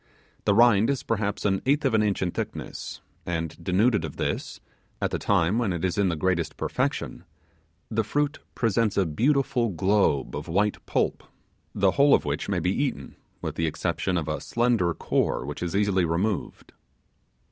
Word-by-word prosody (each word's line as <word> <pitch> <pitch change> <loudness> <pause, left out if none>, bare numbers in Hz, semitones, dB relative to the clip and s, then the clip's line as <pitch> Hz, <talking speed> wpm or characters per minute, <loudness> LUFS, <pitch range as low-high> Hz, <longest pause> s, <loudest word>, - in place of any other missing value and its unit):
The 100 - +3
rind 115 -1 +5
is 140 -2 -1
perhaps 105 -2 -2
an 95 -2 +1
eighth 145 +2 +2
of 130 - +2
an 110 - +4
inch 105 -3 0
in 90 - -1
thickness; - - -6 0.2
and 85 -2 -3
denuded 100 +2 +2
of 80 - -5
this - - -3 0.4
at - - -1
the - - -1
time 100 +2 +2
when 115 -5 0
it 85 0 -2
is 90 - 0
in 100 -2 +2
the 85 - -1
greatest 85 +1 -1
perfection, - - -2 0.7
the 110 0 +1
fruit 145 +7 -1 0.2
presents 115 -2 +1
a 100 - +3
beautiful 125 - +1
globe 95 -6 +1
of 75 +3 -5
white 100 +5 0
pulp, - - 0 0.5
the - - +3
whole 140 0 +5
of - - -1
which - - -2
may - - +1
be 90 - 0
eaten, 130 - -2 0.3
with - - -2
the 80 - -1
exception 90 +3 -1
of 80 -3 -2
a 75 - -2
slender 115 -7 +1
core, - - 0
which 75 +1 -6
is 90 +1 -2
easily 100 -2 +2
removed. 90 +5 -2
100 Hz, 180 wpm, -26 LUFS, 85-115 Hz, 0.7 s, rind